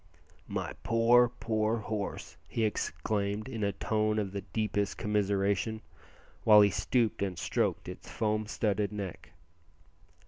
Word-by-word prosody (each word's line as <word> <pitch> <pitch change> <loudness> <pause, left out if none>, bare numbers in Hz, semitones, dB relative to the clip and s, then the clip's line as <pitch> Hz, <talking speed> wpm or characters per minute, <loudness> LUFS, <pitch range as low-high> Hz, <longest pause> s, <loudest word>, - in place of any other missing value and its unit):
"My - - -3
poor, 120 +2 +5
poor 110 -2 -1
horse!" 105 -2 -4
he 115 - -1
exclaimed 105 0 -2
in 115 -5 -4
a 100 - +2
tone 110 +1 0
of 100 -3 -1
the 100 0 -4
deepest 100 +1 -2
commiseration, 100 +1 0 0.6
while 105 -1 +8
he 100 -1 +5
stooped 110 +5 0
and 95 -3 -1
stroked - - -1
its - - -8
foam 110 -1 -1
studded 105 -1 0
neck. 100 -5 -6
105 Hz, 130 wpm, -30 LUFS, 100-110 Hz, 0.6 s, while